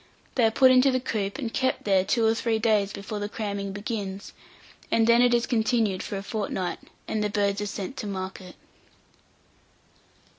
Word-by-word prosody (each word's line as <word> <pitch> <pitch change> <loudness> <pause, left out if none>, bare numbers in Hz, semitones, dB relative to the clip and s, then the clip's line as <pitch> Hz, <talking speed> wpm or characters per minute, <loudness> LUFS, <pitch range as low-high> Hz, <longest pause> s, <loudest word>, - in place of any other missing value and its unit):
They 245 - +3
are - - +5
put 260 +3 +5
into 255 +1 +5
the 255 -1 +1
coop, 210 -6 -3
and 240 -6 -4
kept 260 0 0
there 195 -2 +3
two 230 +3 +1
or 220 - +4
three 225 0 0
days 215 -3 +2
before 200 +1 -6
the 205 0 -3
cramming 200 -2 -4
begins, 205 -1 -5 0.6
and 225 - +3
then 235 +1 +5
it 245 0 +5
is 240 -1 +2
continued 220 -4 +1
for 200 - -4
a 195 - -5
fortnight, 200 -4 -3 0.3
and 215 -1 -1
the 210 - 0
birds 200 0 0
are 205 - -2
sent 200 +5 -5
to 210 - -4
market. 190 -1 -6
210 Hz, 185 wpm, -26 LUFS, 200-235 Hz, 0.6 s, are